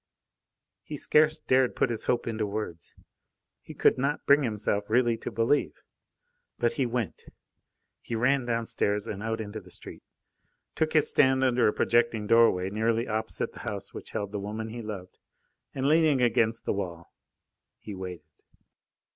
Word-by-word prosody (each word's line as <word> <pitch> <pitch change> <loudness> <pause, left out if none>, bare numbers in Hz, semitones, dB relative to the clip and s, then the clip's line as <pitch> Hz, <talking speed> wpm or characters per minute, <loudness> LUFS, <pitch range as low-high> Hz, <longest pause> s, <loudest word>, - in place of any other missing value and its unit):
He 145 +9 -7
scarce 155 +2 +3
dared 130 -4 +2
put 120 - +1
his 115 - -3
hope 120 - 0
into 110 -2 -2
words. 100 -6 -6 0.7
He - - -11
could - - +3
not 140 +3 -1
bring 145 +1 +5
himself 105 -4 -1
really 120 +1 +3
to - - -5
believe. 115 +6 0 0.7
But 120 - +1
he 135 -3 0
went. 120 -3 -3 0.8
He 120 - -5
ran 125 +3 +2
downstairs 115 -3 0
and 100 -3 -5
out 110 +1 -2
into 110 0 -5
the 90 - -17
street, - - -8 0.7
took 155 0 -1
his 155 -2 +4
stand 130 0 +3
under 125 -2 +3
a - - +3
projecting 120 -2 +1
doorway 105 -4 +4
nearly 115 +2 0
opposite 110 0 -2
the - - -11
house - - -6
which - - -9
held 100 -1 -4
the 105 - -3
woman 110 +3 -5
he 120 +2 -6
loved, 100 -4 -8 0.5
and 135 +1 -2
leaning 155 -2 +4
against 115 -2 +2
the - - 0
wall, 85 -4 -6 0.6
he 105 - -9
waited. 90 -4 -7
115 Hz, 160 wpm, -28 LUFS, 105-125 Hz, 0.8 s, bring